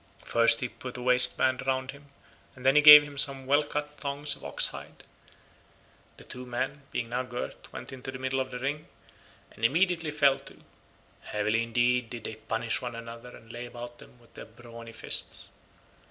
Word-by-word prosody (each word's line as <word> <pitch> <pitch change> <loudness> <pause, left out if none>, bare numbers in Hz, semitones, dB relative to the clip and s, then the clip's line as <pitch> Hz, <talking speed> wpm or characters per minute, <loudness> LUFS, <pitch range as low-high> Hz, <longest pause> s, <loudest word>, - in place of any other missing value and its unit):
First 115 0 +4
he 125 - -1
put 125 +1 -9
a - - -7
waistband 125 +1 +4
round 130 0 -1
him 140 +1 -17 0.5
and 130 -1 -13
then 135 +1 +4
he 150 - +6
gave 150 0 +11
him 145 -1 -6
some 135 -1 +2
well 145 +3 +3
cut 150 0 -5
thongs 145 +1 -2
of - - -15
ox - - +3
hide; - - -11 1.1
the - - -15
two 125 - -9
men 130 +3 -4
being 115 - -4
now 125 +1 -2
girt 125 -1 -8
went - - -9
into 130 0 -8
the 130 - -8
middle 130 +1 -2
of 130 0 -3
the 125 - -7
ring, 145 +4 -4 0.6
and 110 - -16
immediately 165 +5 +1
fell 140 -2 +2
to; 135 - -15 0.6
heavily 105 +2 -1
indeed 120 +1 0
did 120 -2 -8
they - - -6
punish 110 +1 -3
one 120 -2 -6
another 115 +1 -10
and 115 0 -15
lay 120 +1 -7
about 120 0 -10
them - - -17
with 115 - -24
their - - -10
brawny 115 0 -13
fists. 115 - -4
125 Hz, 190 wpm, -27 LUFS, 115-140 Hz, 1.1 s, gave